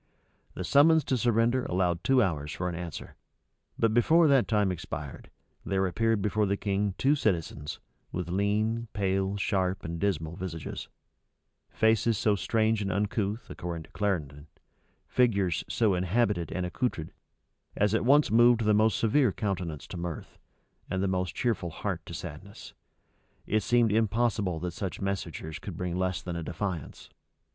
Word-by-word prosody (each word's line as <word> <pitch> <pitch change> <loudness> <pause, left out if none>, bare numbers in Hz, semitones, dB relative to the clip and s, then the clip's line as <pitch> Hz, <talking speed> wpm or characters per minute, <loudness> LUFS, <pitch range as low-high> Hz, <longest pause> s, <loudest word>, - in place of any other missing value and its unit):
The 95 - -4
summons 150 - +5
to 130 - 0
surrender 120 +1 +2
allowed 90 -2 0
two 130 -2 +4
hours 75 -6 -2
for 90 - -3
an 90 - -2
answer; 85 -2 -7 0.6
but 115 -1 +2
before 160 +8 +5
that 135 -3 +4
time 105 -3 +2
expired, 75 -5 -7 0.3
there 95 -1 0
appeared 110 +3 +1
before 105 0 +1
the 100 +1 0
king 100 -1 -1
two 140 +2 +3
citizens, 85 - -2 0.3
with 90 -2 -3
lean, 105 +5 0
pale, 95 0 0
sharp, 95 -2 -1
and 85 0 -4
dismal 85 -5 -1
visages; 90 -5 -6 0.8
faces 110 0 +2
so 105 0 +2
strange 110 +2 +1
and 95 -1 -1
uncouth, 105 +2 -1
according 85 -2 -5
to - - -19
Clarendon, 75 -8 -2 0.6
figures 100 -9 +2
so 110 -4 +2
habited 90 -1 0
and 90 -1 -2
accoutred, 90 -3 -3 0.6
as 105 0 +2
at 110 - +2
once 140 +2 +4
moved 120 +1 +5
the 105 -1 +3
most 110 +1 +3
severe 120 +1 +3
countenance 90 -7 -3
to 90 - -8
mirth, 85 -2 -6 0.5
and 95 0 -1
the - - +1
most 90 -1 -1
cheerful 110 -8 -1
heart 85 0 -4
to 85 - -6
sadness; 85 +5 -9 0.7
it 110 +1 +1
seemed 120 +1 +3
impossible 110 -5 +1
that 90 +1 -3
such 95 +1 -4
messengers 85 -5 -4
could 95 -5 -7
bring 90 -1 -3
less 95 0 -1
than 90 -2 -4
a 85 - -3
defiance. 90 -1 -5
100 Hz, 155 wpm, -28 LUFS, 90-110 Hz, 0.8 s, summons